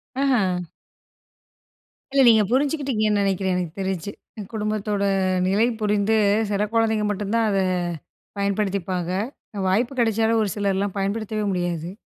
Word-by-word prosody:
அ 240 -10 +1 1.5
இல்ல 275 - +5
நீங்க 220 -2 +6
புரிஞ்சுக்கிட்டிங்கன்னு 260 -7 +1
நினைக்கிறேன், 190 -1 0
எனக்கு 175 -3 -3
தெரிஞ்சு. 190 0 -3 0.4
குடும்பத்தோட 210 -1 -1 0.4
நிலை 210 +5 +3
புரிந்து 210 +1 +2 0.3
சில 205 0 +1
குழந்தைங்க 220 -2 +2
மட்டும் 205 0 -3
தான், 230 -1 +2
அத 195 - +1 0.8
பயன்படுத்திப்பாங்க. 195 -3 -1 0.6
வாய்ப்பு 230 +8 +1
கிடைச்சாலும் 225 0 +2
ஒரு 210 - 0
சிலர்லாம் 200 -1 -1
பயன்படுத்தவே 215 +2 -2
முடியாது. 175 -2 -2
210 Hz, 110 wpm, -23 LUFS, 195-220 Hz, 1.5 s, நீங்க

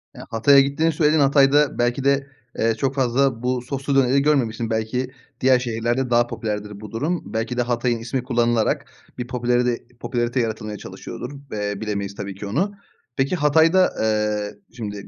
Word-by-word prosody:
Ya, - - -10
Hatay'a 135 +5 +5
gittiğini 140 +4 +2
söyledin. 155 0 +2
Hatay'da 140 +1 +4
belki 120 +2 0
de, 140 0 +2 0.3
eee, 115 0 +2
çok 135 +3 -1
fazla 130 -2 +1
bu 125 0 0
soslu 135 +2 -3
döneri 135 0 +4
görmemişsin; 120 -6 +1
belki 115 +3 -2 0.3
diğer 130 -1 +5
şehirlerde 120 +1 -1
daha 120 0 +3
popülerdir 105 -3 -4
bu 105 -2 -9
durum. 150 +9 -2
Belki 115 +3 -2
de - - +3
Hatay'ın 120 -1 0
ismi 120 +2 -3
kullanılarak 120 -3 +1 0.3
bir 125 -1 -4
popülaride 120 0 +1 0.2
popülarite 120 +1 -1
yaratılmaya 110 -2 -3
çalışıyordur 120 +5 -8 0.2
ve 105 -1 -3
bilemeyiz 100 -2 -3
tabii 100 -2 -6
ki 100 - -7
onu. 165 - 0 0.5
Peki, 135 +6 +1
Hatay'da, 160 +4 +4
ııı, 105 -1 -1
şimdi 105 -4 -6
120 Hz, 160 wpm, -22 LUFS, 110-135 Hz, 0.5 s, Hatay'a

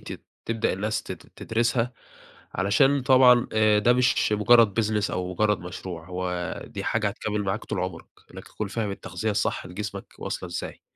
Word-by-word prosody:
تت - - -8 0.2
تبدأ 115 0 0
الناس 105 +3 -2
تد - - -6 0.2
تدرسها. 115 +2 0 0.6
علشان 135 +8 +3
طبعًا 130 -2 +6
آآ 110 -1 +4
ده 120 +4 +4
مش 125 -3 +2
مٌجرّد 110 0 +5
business 105 -1 0
أو 90 0 -3
مُجرّد 105 +2 +1
مشروع، 90 -1 -7
هو 90 -1 -3
دي - - -6
حاجة 110 -2 0
هتكمّل 105 0 -3
معاك 100 +3 -2
طول - - -3
عُمرك. 90 -2 -4 0.3
أنك - - -9
تكون 105 - -5
فاهم 105 0 -2
التغذية 100 +2 -3
الصح 100 - -1
لجسمك 100 +1 -7
واصلة 90 - -4
إزاي. 85 - -6
105 Hz, 165 wpm, -25 LUFS, 95-115 Hz, 0.6 s, طبعًا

